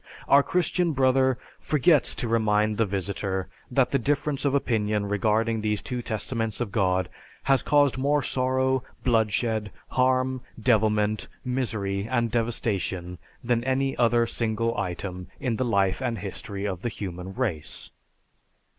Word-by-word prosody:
Our 140 - +7
Christian 175 +1 +1
Brother 130 -1 +3 0.2
"forgets" 150 -2 +3
to 120 - -2
remind 110 -2 +2
the 115 - +2
visitor 95 0 -2 0.2
that 125 0 +2
the 140 - +2
difference 145 +2 -1
of 140 0 +2
opinion 105 -6 0
regarding 110 +2 +1
these 105 -1 0
two 125 -1 -4
Testaments 115 -1 -3
of 120 -5 -2
God 95 -3 +1 0.4
has 135 -1 +3
caused 145 -3 +3
more 145 +1 +2
sorrow, 130 0 +1 0.2
bloodshed, 110 -2 +1 0.2
harm, 130 0 +1 0.2
devilment, 110 -3 +2 0.2
misery, 110 -6 -1
and 120 -3 +1
devastation 100 -7 -2 0.2
than 120 -1 +1
any 135 +1 0
other 120 -1 +3
single 115 0 -1
item 90 -1 -4
in 125 -5 -1
the 130 - 0
life 100 -2 +1
and 120 -3 -1
history 100 +1 -5
of 95 -3 -3
the 120 - -1
human 95 -3 -6
race. 105 - -3
115 Hz, 135 wpm, -26 LUFS, 105-130 Hz, 0.4 s, Our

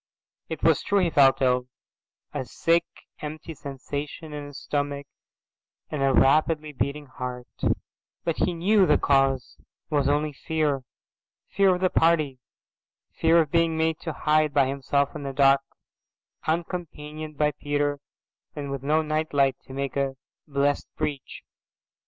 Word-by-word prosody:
It - - -5
was - - +4
true 200 - +1
he 180 -4 +2
felt 135 -2 +5
ill, 125 -1 +2 0.7
a - - -2
sick 165 +6 +1 0.3
empty 155 +2 -6
sensation 145 +2 -6
in 145 -1 -6
his 145 - -10
stomach 145 -1 -2 0.9
and 150 - -2
a 135 0 +3
rapidly 150 +3 +3
beating 145 +2 -2
heart, 125 -2 -6 0.8
but 165 - -1
he 180 - +1
knew 190 +3 +4
the - - +5
cause 135 -2 +2 0.3
was 145 -2 +2
only 150 +1 +1
fear, 150 -2 -1 0.7
fear 190 -1 +4
of 180 - -6
the 185 - +2
party, 155 -5 +2 0.7
fear 165 +1 +4
of 150 -3 -3
being 165 -1 +2
made 160 0 +1
to 160 - -4
hide 155 -1 +2
by 140 -2 +5
himself 140 +2 0
in 150 - -5
the 140 -1 -4
dark, 135 0 +5 0.9
uncompanioned 155 -2 -4
by 150 0 +3
Peter 145 -1 -1 0.6
and 140 -2 -5
with 140 -1 -3
no 155 +3 +2
night 155 0 -2
light 135 -1 +3
to 130 - -9
make 140 0 -3
a 135 -1 0 0.3
blessed 140 0 0
breach. 150 -3 -4
145 Hz, 145 wpm, -26 LUFS, 140-160 Hz, 0.9 s, felt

